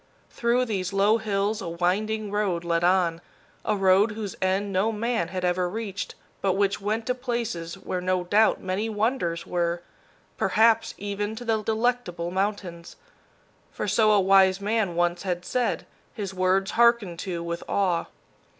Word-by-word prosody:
Through 240 +2 +1
these 195 -5 -3
low 205 +3 +3
hills 210 0 -1
a 170 - -4
winding 205 +5 -1
road 200 -5 0
led 170 0 0
on, 175 -2 +2 0.4
a 215 - +1
road 195 +2 +4
whose 210 -3 -5
end 195 +2 0
no 195 +4 +2
man 225 -4 -1
had 185 +1 -3
ever 180 0 +1
reached, 205 -1 -5 0.3
but 195 -1 +2
which 200 +1 0
went 215 +3 -1
to 250 - +1
places 235 -10 -3
where, 185 -1 -4
no 185 0 0
doubt, 210 +5 +3
many 190 +4 -2
wonders 210 -6 -1
were 170 0 -1 0.5
perhaps 225 +1 +3
even 205 +1 -3
to 245 +2 -8
the 220 -2 +1
Delectable 220 -6 -1
Mountains; 190 -3 -3 0.8
for - - -4
so 215 -2 +4
a 210 - +5
wise 190 0 +5
man 205 -3 0
once 175 0 +1
had 180 -2 -3
said, 250 -1 -1 0.3
his 200 -5 -4
words 190 +1 +1
harkened 235 -7 +3
to 175 -3 -4
with 170 0 -4
awe. 185 -4 +1
195 Hz, 160 wpm, -26 LUFS, 180-220 Hz, 0.8 s, a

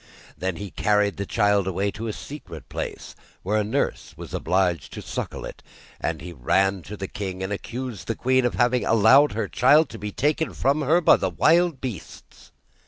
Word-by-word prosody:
Then 95 -1 -3
he 100 +1 -7
carried 105 -1 +1
the 100 0 -4
child 100 -2 +2
away 95 +2 -1
to 115 +3 -6
a - - -1
secret 145 +7 -9
place, - - -6 0.3
where 105 +3 +1
a - - +1
nurse 105 - -2
was - - -9
obliged 90 -1 0
to - - -6
suckle - - -5
it, - - -9 0.4
and 80 -3 -3
he 90 +2 -8
ran 95 +8 +1
to 105 - -6
the 95 - -4
king 95 -2 -5
and 95 +2 -2
accused 120 +1 -6
the 115 - -1
queen 130 +2 +2
of 120 - 0
having 120 +1 +2
allowed 115 +7 +5
her 110 -2 -2
child 145 +8 +4
to 115 - -9
be 105 0 -5
taken 150 +7 0
from 140 +3 +1
her 160 +5 +3
by - - +6
the 95 - -1
wild 160 - +3
beasts. 115 -11 -9
105 Hz, 195 wpm, -24 LUFS, 95-130 Hz, 0.4 s, by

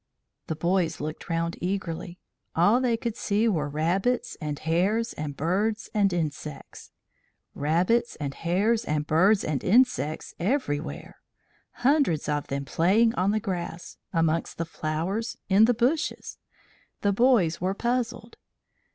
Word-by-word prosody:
The 160 - -2
boys 170 0 0
looked 155 +3 -6
round 165 0 -1
eagerly. 180 -1 -3 0.4
All 205 +9 +4
they 240 -3 +1
could 230 -1 -3
see 210 +1 +1
were 155 -9 0
rabbits 180 - 0
and 150 -1 -3
hares 190 +10 0
and 145 -2 -5
birds 200 +8 -1
and 200 -3 +3
insects 155 -3 -5 0.6
rabbits 175 +11 +1
and 140 -2 -4
hares 205 +9 +1
and 150 -5 -1
birds 190 +7 +4
and 150 -4 -2
insects 220 - +2
everywhere 145 - -2 0.7
hundreds 275 - +3
of 145 -1 -1
them 140 0 -3
playing 200 - +3
on 185 -2 +1
the 215 +1 +1
grass, 175 -3 -5
amongst 165 -1 0
the 165 - -2
flowers, 165 +8 -3
in 200 +3 +6
the 245 - +3
bushes. 260 +7 -1 0.6
The 200 -1 +2
boys 200 -8 +3
were 190 +2 0
puzzled. 235 0 -2
180 Hz, 135 wpm, -26 LUFS, 160-225 Hz, 0.7 s, in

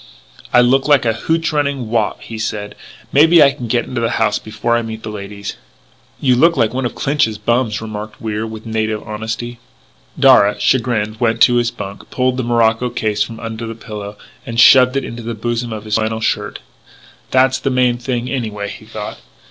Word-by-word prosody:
"I 125 - +6
look 130 +3 +3
like 145 -4 +4
a 115 - +2
hootch 165 +7 -1
running 140 -5 -1
Wop," 110 -2 -1
he 110 -1 -7
said. 105 -2 -4 0.4
"Maybe 160 +3 +7
I 140 - +5
can 125 -3 -7
get 120 +1 0
into 120 -2 -4
the 115 - +1
house 105 -2 +1
before 110 +2 -2
I 120 - +1
meet 110 -1 -7
the 110 - -5
ladies 100 0 -7 0.3
" - - -34
"You 130 -3 +3
look 165 +5 +4
like 115 -2 +2
one 130 -1 -1
of - - -10
Clinch's 135 -7 0
bums," 115 0 0
remarked 105 0 -7
Wier 110 0 -3
with 110 0 -9
native 110 -1 -2
honesty. 115 +2 -5 0.6
Darragh, 105 +1 +5
chagrined, 110 -3 0
went 115 -1 +1
to 120 - +6
his 120 -1 +2
bunk, 100 -3 -9
pulled 130 0 0
the 130 - -1
morocco 115 0 +2
case 105 -3 -2
from 115 +1 -2
under 115 0 -5
the 115 - -6
pillow, 105 -2 -8 0.3
and 115 0 -4
shoved 125 +2 +7
it 135 - -2
into 115 +1 -7
the 115 0 -5
bosom 120 +2 -3
of 110 -1 -5
his 110 0 0
flannel 110 0 -1
shirt. 110 - -2 0.7
"That's 130 0 +3
the 135 - -1
main 125 -2 +2
thing 125 -1 -3
anyway," 110 -6 -3
he 110 - -10
thought. 110 -1 -7
115 Hz, 200 wpm, -17 LUFS, 110-125 Hz, 0.7 s, Maybe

